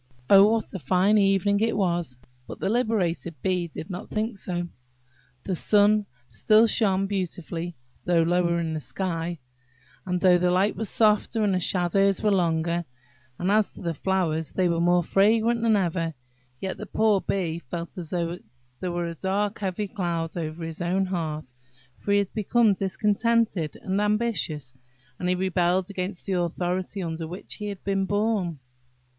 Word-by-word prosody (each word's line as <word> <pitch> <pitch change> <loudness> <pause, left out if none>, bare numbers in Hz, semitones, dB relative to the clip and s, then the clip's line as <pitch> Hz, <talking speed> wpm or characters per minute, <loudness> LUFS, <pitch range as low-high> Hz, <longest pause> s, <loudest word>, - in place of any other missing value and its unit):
Oh, 200 +2 +8
what 225 -1 -2
a 190 - -4
fine 185 +8 +3
evening 195 0 +3
it 225 0 +1
was! 175 -9 -1 0.3
But - - -8
the - - -1
liberated 195 - 0
Bee 180 -2 0
did 160 +2 -8
not 180 +3 -6
think 215 +1 -2
so. 175 -2 -3 0.8
The 190 - -2
sun 205 +3 +3 0.2
still 220 +1 +5
shone 195 -4 +2
beautifully 175 -3 -4 0.3
though 170 -2 +3
lower 170 0 +2
in 165 -1 -2
the 155 - -2
sky, 170 0 -3 0.7
and 180 -1 -1
though 180 -1 +5
the 180 0 +2
light 185 +3 +2
was 220 -1 -2
softer, 215 0 +2
and 200 -2 +2
the 185 - +1
shadows 195 +3 +2
were 210 - +3
longer; 170 -2 +1 0.5
and 180 +3 0
as 215 0 +2
to - - -9
the 170 -1 -1
flowers, 165 -3 -1
they 185 -1 +2
were 170 -1 0
more 175 0 +3
fragrant 225 +6 +3
than 225 -1 +3
ever; 170 -4 -1 0.4
yet 190 -1 -4
the 210 - -7
poor 215 -2 +2
Bee 170 -4 -2
felt 170 +3 -7
as 165 -3 -7
if 175 0 -2 0.4
there 180 - -3
were 175 0 -2
a 170 - -4
dark 200 +4 -1
heavy 200 +1 -2
cloud 170 -4 -3
over 165 -1 -4
his 165 +1 -6
own 185 +3 +1
heart, 155 -7 -4 0.4
for 200 - -4
he 200 - +5
had 200 -2 -1
become 220 +1 +3
discontented 210 -2 0
and 195 +1 0
ambitious, 210 - -1 0.5
and 180 - -1
he 180 - +2
rebelled 180 0 +1
against 185 -1 -4
the 195 - -1
authority 180 +2 -2
under 165 -1 -4
which 180 +4 -8
he 210 - -5
had 200 -2 -6
been 195 -1 0
born. 205 -5 0
185 Hz, 170 wpm, -25 LUFS, 170-205 Hz, 0.8 s, Oh